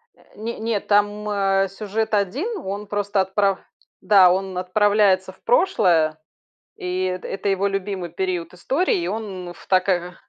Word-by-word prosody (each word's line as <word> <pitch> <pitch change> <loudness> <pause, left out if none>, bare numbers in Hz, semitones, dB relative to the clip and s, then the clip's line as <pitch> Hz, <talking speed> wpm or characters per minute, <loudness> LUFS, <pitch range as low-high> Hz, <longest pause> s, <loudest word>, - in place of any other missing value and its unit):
Э, - - -25
не 225 +3 -5
нет, 220 -2 -2
там, 205 +1 +1
э, 195 -1 +2
сюжет 215 +3 -3
1, 260 - 0
он 200 +2 -5
просто 205 -1 0
отправ 195 +1 +1 0.4
да, 190 -4 +6
он 190 0 -2
отправляется 190 0 +2
в - - -27
прошлое, 180 - +3 0.6
и 180 +1 -3
это 185 0 -3
это 195 +1 -3
его 195 +1 +1
любимый 195 -2 -3
период 180 -1 -3
истории, 270 - 0
и 170 - -2
он 190 -4 -5
в - - -17
так, 185 0 +2
ага 180 -1 -1
195 Hz, 155 wpm, -22 LUFS, 185-210 Hz, 0.6 s, да